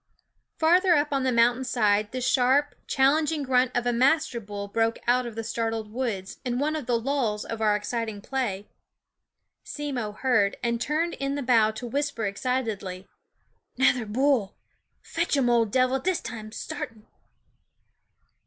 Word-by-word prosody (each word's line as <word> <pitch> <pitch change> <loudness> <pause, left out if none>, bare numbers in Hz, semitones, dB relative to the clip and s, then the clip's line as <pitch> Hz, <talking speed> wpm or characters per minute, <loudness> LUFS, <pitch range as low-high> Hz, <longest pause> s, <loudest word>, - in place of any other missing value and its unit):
Far 335 +3 +4
up 290 -1 +1
on 275 - +1
the 260 0 +1
mountain 240 +2 +3
side 210 -4 +1
the 255 - -4
sharp, 260 +3 +2
challenging 300 +3 +2
grunt 255 -1 +2
of 245 - -1
a 245 - +1
master 260 0 +2
bull 205 -2 -6
broke 225 +2 0
out 245 +1 +2
of 230 - -8
the 225 - -4
startled 225 -1 -3
woods 220 -7 -3
in 245 -2 -2
one 300 +4 0
of 295 -6 -5
the 240 -2 +2
lulls 230 -5 -1
of 225 -1 -5
our 210 -1 +3
exciting 220 0 -3
play. 205 -4 -3 1.0
Simmo 265 -8 -4
heard, 215 -4 +1
and 235 -1 0
turned 320 +5 0
in 275 0 -2
the 285 - -3
bow 230 -4 +4
to 220 +3 -6
whisper 280 -1 -2
excit 250 +6 -1
edly: 190 -4 -5 0.4
" - - -45
Nother 250 -3 +3
bull! 245 -2 +1 0.5
Fetch 330 -3 -1
urn 265 -3 +2
OF 235 -2 +3
Dev'l 255 +3 +2
this 365 +5 0
time, 215 -2 -7
sartin." 220 0 -7
245 Hz, 160 wpm, -26 LUFS, 220-270 Hz, 1.0 s, Far